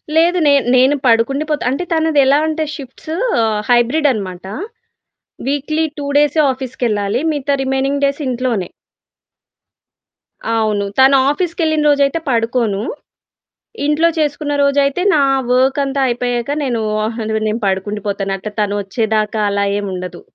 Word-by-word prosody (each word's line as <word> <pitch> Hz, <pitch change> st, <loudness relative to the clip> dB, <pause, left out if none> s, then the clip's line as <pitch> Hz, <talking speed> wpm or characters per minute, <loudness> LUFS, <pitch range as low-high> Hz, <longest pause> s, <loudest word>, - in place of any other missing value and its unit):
లేదు. 345 Hz, +2 st, +4 dB
నేన్ 280 Hz, -2 st, +4 dB
నేను 260 Hz, +3 st, +4 dB
పడుకుండి 245 Hz, +6 st, +2 dB
పోతా. 300 Hz, -4 st, -1 dB
అంటే 340 Hz, +7 st, -2 dB
తనది 320 Hz, -2 st, +2 dB
ఎలా 275 Hz, +2 st, +4 dB
అంటే 315 Hz, 0 st, -1 dB
షిఫ్ట్స్ 270 Hz, +1 st, -11 dB
షిఫ్ట్స్ 230 Hz, -, 0 dB
హైబ్రిడ్ 245 Hz, +6 st, +3 dB
అనమాట. 190 Hz, -5 st, -5 dB, 1.0 s
వీక్లీ 295 Hz, +3 st, 0 dB
2 285 Hz, -, -4 dB
డేసే 295 Hz, +2 st, +2 dB
ఆఫీస్‌కెళ్ళాలి. 240 Hz, -3 st, -2 dB
మిగతా 285 Hz, -1 st, -1 dB
రిమైనింగ్ 270 Hz, +1 st, -1 dB
డేస్ 280 Hz, +2 st, -1 dB
ఇంట్లోనే. 245 Hz, -7 st, -2 dB, 1.9 s
అవును. 210 Hz, -2 st, 0 dB
తను 270 Hz, +1 st, +6 dB
ఆఫీస్‌కెళ్ళిన 315 Hz, -1 st, 0 dB
రోజైతే 285 Hz, +2 st, +2 dB
పడుకోను. 230 Hz, -3 st, 0 dB, 1.1 s
ఇంట్లో 310 Hz, +3 st, +3 dB
చేసుకున్న 295 Hz, -1 st, -1 dB
రోజైతే 280 Hz, +4 st, +2 dB
నా 295 Hz, -, +3 dB, 0.3 s
వర్క్ 260 Hz, +2 st, +2 dB
అంతా 275 Hz, 0 st, -2 dB
అయిపోయాక 245 Hz, +1 st, -2 dB
నేను, 240 Hz, -4 st, -1 dB, 0.2 s
ఆహ్, 225 Hz, +1 st, -4 dB, 0.3 s
నేను 220 Hz, +3 st, -2 dB
పడుకుండి 195 Hz, +2 st, -2 dB
పోతాను. 195 Hz, -1 st, -2 dB
అట్లా 210 Hz, +2 st, -7 dB
తనొచ్చేదాకా 210 Hz, +1 st, -1 dB
అలా 200 Hz, 0 st, 0 dB
ఏముండదు. 185 Hz, -3 st, -5 dB
260 Hz, 125 wpm, -17 LUFS, 215-290 Hz, 1.9 s, తను